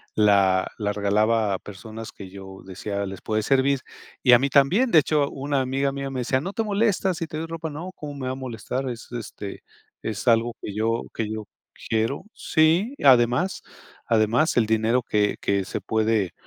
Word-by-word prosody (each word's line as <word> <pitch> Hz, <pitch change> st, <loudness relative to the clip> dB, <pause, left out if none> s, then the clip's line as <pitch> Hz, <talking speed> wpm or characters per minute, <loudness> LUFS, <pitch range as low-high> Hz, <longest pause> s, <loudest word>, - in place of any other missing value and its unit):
la 100 Hz, -3 st, +4 dB
la 105 Hz, -1 st, -1 dB
regalaba 105 Hz, +1 st, +2 dB
a 95 Hz, -, -2 dB
personas 110 Hz, +3 st, -9 dB
que 95 Hz, -2 st, -10 dB
yo 95 Hz, 0 st, -10 dB
decía: 100 Hz, +1 st, -4 dB
"Les 95 Hz, -1 st, -7 dB
puede 110 Hz, -1 st, -1 dB
servir", 135 Hz, +1 st, +2 dB, 0.4 s
y 125 Hz, -, +6 dB
a 120 Hz, -, +8 dB
mí 140 Hz, +1 st, 0 dB
también. 175 Hz, -, +4 dB
De 170 Hz, -, +5 dB
hecho, 145 Hz, -1 st, +1 dB
una 140 Hz, 0 st, -1 dB
amiga 135 Hz, +2 st, 0 dB
mía 140 Hz, 0 st, -4 dB
me 130 Hz, -2 st, -3 dB
decía: 130 Hz, +2 st, 0 dB
"¿No 195 Hz, +4 st, -5 dB
te 225 Hz, -, -1 dB
molesta 200 Hz, -3 st, +1 dB
si 165 Hz, -1 st, -4 dB
te 155 Hz, -, -6 dB
doy 160 Hz, -, -3 dB
ropa?", 165 Hz, -1 st, -5 dB
"No, 165 Hz, +5 st, -6 dB
¿cómo 145 Hz, -1 st, -7 dB
me 135 Hz, -, -5 dB
va -, -, -1 dB
a -, -, -3 dB
molestar? 130 Hz, +1 st, -4 dB
Es, 120 Hz, -2 st, -8 dB
este, 110 Hz, -4 st, -7 dB, 0.4 s
es 110 Hz, +2 st, -4 dB
algo 115 Hz, 0 st, +3 dB
que 100 Hz, -, -6 dB
yo 115 Hz, +2 st, 0 dB
que 110 Hz, -2 st, -3 dB
yo 110 Hz, -1 st, -5 dB, 0.4 s
quiero". 115 Hz, +8 st, 0 dB
Sí, 170 Hz, -, +2 dB
además 130 Hz, +7 st, +4 dB, 0.5 s
además, 115 Hz, +7 st, +2 dB
el 115 Hz, -, +4 dB
dinero 110 Hz, +3 st, +1 dB
que 105 Hz, -2 st, +1 dB
que 100 Hz, -1 st, 0 dB
se -, -, -4 dB
puede, 110 Hz, -4 st, 0 dB
120 Hz, 195 wpm, -24 LUFS, 105-140 Hz, 0.5 s, a